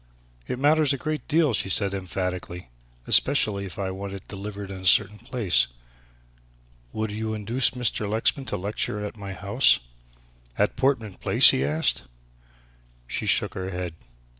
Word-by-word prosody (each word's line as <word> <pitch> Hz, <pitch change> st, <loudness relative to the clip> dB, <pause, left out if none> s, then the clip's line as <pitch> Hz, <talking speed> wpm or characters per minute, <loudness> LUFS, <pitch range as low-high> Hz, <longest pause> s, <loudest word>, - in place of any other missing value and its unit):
"It -, -, -3 dB
matters 145 Hz, +1 st, +3 dB
a -, -, -2 dB
great 155 Hz, +2 st, -4 dB
deal," 155 Hz, -4 st, +2 dB
she 95 Hz, -, -1 dB
said 100 Hz, +1 st, +1 dB
emphatically, 90 Hz, -4 st, -5 dB, 0.4 s
"especially 105 Hz, -8 st, +3 dB
if 90 Hz, -, -9 dB
I 95 Hz, -1 st, -3 dB
want 100 Hz, +1 st, -6 dB
it 100 Hz, -, -10 dB
delivered 100 Hz, 0 st, -7 dB
in 95 Hz, -1 st, -8 dB
a -, -, -8 dB
certain 105 Hz, +3 st, +3 dB
place. 120 Hz, -5 st, +1 dB, 1.2 s
Would 110 Hz, +5 st, -3 dB
you 110 Hz, +1 st, -3 dB
induce 115 Hz, +5 st, +1 dB
Mr. 125 Hz, -4 st, -1 dB
Lexman 115 Hz, +5 st, +1 dB
to -, -, -2 dB
lecture 105 Hz, +1 st, -2 dB
at 105 Hz, -, -7 dB
my 100 Hz, -2 st, -7 dB
house?" 100 Hz, +7 st, +3 dB, 0.8 s
"At -, -, +1 dB
Portman 115 Hz, -8 st, 0 dB
Place!" -, -, +7 dB
he 65 Hz, -, 0 dB
asked. 75 Hz, 0 st, 0 dB, 1.0 s
She -, -, -4 dB
shook -, -, +2 dB
her 95 Hz, 0 st, -5 dB
head. 90 Hz, -2 st, -5 dB
105 Hz, 155 wpm, -25 LUFS, 95-120 Hz, 1.2 s, Place